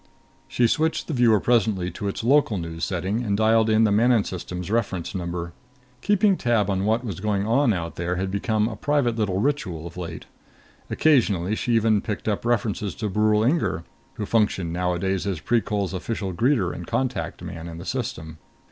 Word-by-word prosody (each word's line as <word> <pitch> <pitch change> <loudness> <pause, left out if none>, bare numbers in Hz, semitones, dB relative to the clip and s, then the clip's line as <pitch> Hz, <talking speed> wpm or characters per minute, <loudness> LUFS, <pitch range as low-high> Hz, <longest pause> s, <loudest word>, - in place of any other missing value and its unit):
She 120 - +1
switched 160 +7 +1
the 160 - -4
viewer 120 -5 +4
presently 100 -6 +1
to 100 - -5
its 100 - -4
local 130 -4 +3
news 85 -1 -5
setting 95 +5 -1
and 100 -3 0
dialed 110 +1 +3
in 110 +1 +4
the 110 - +3
Manon 115 +1 +4
System's 90 0 -6
reference 100 -7 -1
number. 85 -2 -4 0.5
Keeping 205 0 +3
tab 110 -5 +1
on 95 0 0
what 110 +3 +1
was 100 -7 -5
going 100 -1 0
on 120 +3 +3
out 85 -4 -3
there 85 +1 -1
had 95 +1 -2
become 105 +2 0
a 110 - -5
private 130 0 +1
little 100 -4 0
ritual 95 - -1
of 85 +1 -9
late. 85 -3 -6 0.6
Occasionally 105 - +2
she 120 +2 -1
even 110 -2 +3
picked 105 0 -5
up 105 +1 -1
references 110 -4 -1
to 105 - -3
Brule 105 +2 +2
Inger, 130 - +1 0.3
who 105 - -3
functioned 100 -6 +1
nowadays 90 +2 -1
as 95 -5 -2
Precol's 105 -1 0
official 95 0 -3
greeter 115 -2 +1
and 85 - -8
contact 130 -1 -2
man 85 0 -7
in 85 -1 -8
the 85 - -8
system. 110 - -4
105 Hz, 185 wpm, -24 LUFS, 90-115 Hz, 0.6 s, viewer